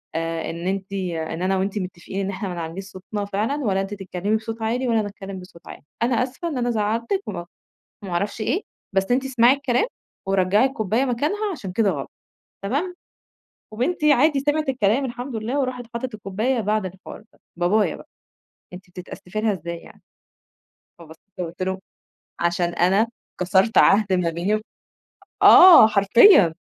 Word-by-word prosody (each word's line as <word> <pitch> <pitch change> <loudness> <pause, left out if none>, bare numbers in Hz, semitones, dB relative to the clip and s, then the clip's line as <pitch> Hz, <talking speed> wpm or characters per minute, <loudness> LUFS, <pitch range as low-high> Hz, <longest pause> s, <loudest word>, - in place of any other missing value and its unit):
آآ، 165 0 -2
إن 170 +2 -5
أنتِ 195 0 -3
إن 170 -3 -3
أنا 190 +1 +1
وأنتِ 195 +2 -2
متفقين 185 +1 -6
إن 195 - -3
احنا 195 0 -4
ما 180 - -5
نعلّيش 170 +3 -5
صوتنا 195 +2 -6
فعلًا 210 +7 -1
ولا 195 -4 +1
أنتِ 195 +1 -5
تتكلمي 195 +1 -2
بصوت 225 +1 -7
عالي 245 +3 -1
ولا 230 -1 +2
أنا 210 - -2
أتكلم 195 -1 -8
بصوت 180 -2 -15
عالي، - - -10 0.2
أنا 245 0 +2
آسفة 275 +7 -5
إن 295 -6 -3
أنا 245 0 0
زعلتِك 230 - -1
و - - -3 0.7
وما 190 -3 -7
أعرفش 200 +5 -2
إيه، 360 - 0 0.3
بس 195 +2 0
أنتِ 255 +2 +2
اسمعي 250 -2 +4
الكلام 275 - 0 0.4
ورجعي 195 +3 +3
الكوباية 240 -1 -1
مكانها 310 - -1
عشان 220 - -7
كده 205 0 +2
غلط، 140 -5 -5 0.5
تمام؟"، 300 - -2 0.8
وبنتي 300 +7 +1
عادي 285 +2 +3
سمعت 295 +1 0
الكلام 250 +1 +1
الحمد 245 0 -6
لله، 230 +6 -2
وراحت 255 -2 -3
حطت 245 0 -4
الكوباية 215 +5 -2
بعد 210 -1 0
الحوار 185 +3 -10
ده، - - -27 0.2
بابايا 200 +4 +1
بقى: - - -14 0.7
"أنتِ 180 +1 -12
بتتأسفي 180 +3 -7
لها 220 -1 +1
إزاي 170 -2 -6
يعني؟" - - -17 1.0
فبصيت 160 -1 -15 0.2
له 180 - -1
وقُلت 170 +2 -8
له: 190 0 -2 0.6
"عشان 170 0 0
أنا 195 +6 +2 0.3
كسرت 190 +4 +2
عهد 200 -1 +5
ما 180 -2 +1
بيني" 185 +6 -1 0.8
آه 350 -11 +10
حرفيًا، 200 - +6
205 Hz, 165 wpm, -22 LUFS, 185-245 Hz, 1.0 s, آه